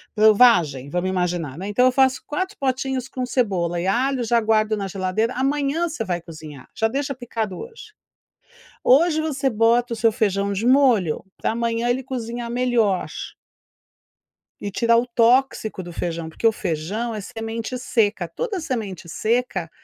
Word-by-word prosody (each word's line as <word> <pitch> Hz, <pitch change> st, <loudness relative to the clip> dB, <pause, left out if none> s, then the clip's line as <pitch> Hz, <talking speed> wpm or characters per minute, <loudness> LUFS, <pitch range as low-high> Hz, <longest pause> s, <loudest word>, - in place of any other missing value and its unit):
para 215 Hz, 0 st, +6 dB
o -, -, 0 dB
vagem, 165 Hz, -, +4 dB
vamos 175 Hz, +4 st, -1 dB
imaginar, 175 Hz, -6 st, -2 dB
né. 190 Hz, +3 st, -5 dB
Então 205 Hz, +5 st, +3 dB
eu 255 Hz, -, +5 dB
faço 260 Hz, 0 st, +2 dB
4 375 Hz, +7 st, -3 dB
potinhos 265 Hz, -1 st, -2 dB
com 255 Hz, -1 st, -3 dB
cebola 185 Hz, -9 st, 0 dB
e 180 Hz, -, -2 dB
alho, 255 Hz, +5 st, +1 dB
já 235 Hz, +1 st, +2 dB
guardo 215 Hz, -1 st, +2 dB
na 200 Hz, -1 st, -3 dB
geladeira. 195 Hz, +5 st, -1 dB
Amanhã 285 Hz, +5 st, 0 dB
você 300 Hz, -8 st, -4 dB
vai 175 Hz, -3 st, -2 dB
cozinhar. 155 Hz, -5 st, -11 dB
Já 225 Hz, -, +2 dB
deixa 275 Hz, +4 st, -2 dB
picado 225 Hz, -6 st, -4 dB
hoje. 455 Hz, -2 st, -10 dB, 0.9 s
Hoje 315 Hz, +4 st, +4 dB
você 280 Hz, -4 st, -1 dB
bota 235 Hz, +2 st, +2 dB
o -, -, -8 dB
seu 225 Hz, +1 st, +3 dB
feijão 200 Hz, -3 st, 0 dB
de 200 Hz, +4 st, -2 dB
molho 245 Hz, -, +3 dB
pra -, -, -1 dB
amanhã 230 Hz, +1 st, -1 dB
ele 255 Hz, +2 st, 0 dB
cozinhar 240 Hz, -2 st, -5 dB
melhor 240 Hz, -6 st, +1 dB, 1.5 s
e 205 Hz, -, -4 dB
tirar 230 Hz, +4 st, +3 dB
o 240 Hz, -, +1 dB
tóxico 235 Hz, -3 st, +2 dB
do 175 Hz, -1 st, -9 dB
feijão, 165 Hz, -1 st, -4 dB
porque 160 Hz, +8 st, -2 dB
o 225 Hz, -, +6 dB
feijão 200 Hz, +6 st, -3 dB
é 215 Hz, -, -4 dB
semente 225 Hz, +4 st, -5 dB
seca. 210 Hz, -7 st, 0 dB
Toda 400 Hz, -, -3 dB
semente 215 Hz, -, -4 dB
seca, 215 Hz, -3 st, -1 dB
230 Hz, 165 wpm, -22 LUFS, 190-255 Hz, 1.5 s, para